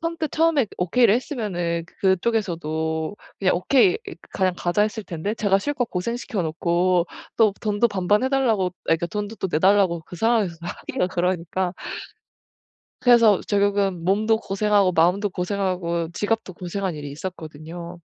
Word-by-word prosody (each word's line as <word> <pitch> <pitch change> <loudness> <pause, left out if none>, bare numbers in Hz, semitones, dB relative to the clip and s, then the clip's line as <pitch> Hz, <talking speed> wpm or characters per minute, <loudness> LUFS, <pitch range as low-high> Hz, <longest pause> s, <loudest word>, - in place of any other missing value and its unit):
선뜻 330 -2 -2
처음에 315 -6 +3
"오케이."를 200 +5 +4
했으면은 185 - -2 0.2
그쪽에서도 170 -5 0 0.2
"그냥 190 -2 +2
오케이 275 - +4
이 - - -7 0.2
그냥 185 -1 +1
가자." 175 +4 0
했을 215 0 -2
텐데 180 +4 -3
제가 200 -3 +2
실컷 250 +1 -2
고생시켜 230 +2 -3
놓고 170 +2 +1 0.3
또 215 -3 +4
돈도 215 +1 +1
반반 200 +2 +1
해 260 - 0
달라고 230 -9 +2
아 - - -12
그러니까 165 +1 +1
돈도 210 +2 -4
또 190 - -2
내 160 - 0
달라고 190 -2 +3
그 175 - -9
상황에서 220 -5 +1
하기가 175 +1 -3
그러니까 180 0 -1 1.3
그래서 230 -5 +5
결국은 200 -3 +1
몸도 215 +5 +2
고생하고 200 -2 +2
마음도 180 +5 +3
고생하고 180 -3 -2
지갑도 215 -1 -2
고생한 185 -1 -3
일이 145 -1 -7
있었거든요. 165 +1 -8
190 Hz, 355 characters per minute, -23 LUFS, 175-215 Hz, 1.3 s, 그래서